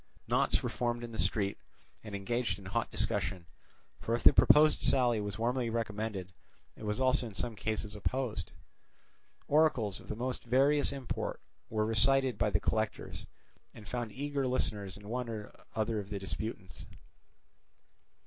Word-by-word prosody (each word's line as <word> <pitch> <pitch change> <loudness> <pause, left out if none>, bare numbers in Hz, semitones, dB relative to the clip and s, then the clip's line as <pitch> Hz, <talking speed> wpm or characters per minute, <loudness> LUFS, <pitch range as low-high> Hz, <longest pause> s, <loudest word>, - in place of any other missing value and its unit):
Knots - - +2
were - - 0
formed 120 -1 -1
in 120 - -6
the 110 - -7
streets 100 -2 0 0.4
and 105 -2 -6
engaged 105 0 -1
in 100 - -12
hot 110 +5 -1
discussion; 100 -4 -1 0.5
for 115 - 0
if 120 - -4
the - - +9
proposed 155 +1 +6
sally 120 -4 +3
was 105 -1 -4
warmly 120 +1 0
recommended, 105 -4 -3 0.4
it - - -11
was 105 +3 -1
also 130 -1 +3
in 105 - -10
some 115 +3 -2
cases 105 0 -2
opposed. 110 -3 -2 1.0
Oracles 140 -10 +3
of - - -14
the - - -3
most 125 +2 -3
various 135 +4 +3
import 135 -3 -4 0.3
were 110 -1 +1
recited 125 +2 +3
by - - +3
the - - +2
collectors, - - -2 0.5
and 105 -2 -11
found 120 0 -3
eager 140 +2 -2
listeners 105 -6 -1
in 105 0 -12
one 125 +1 -3
or 110 -2 -6 0.2
other 110 0 0
of 100 -1 -7
the 105 - -3
disputants. 95 0 -5
115 Hz, 160 wpm, -32 LUFS, 105-125 Hz, 1.0 s, the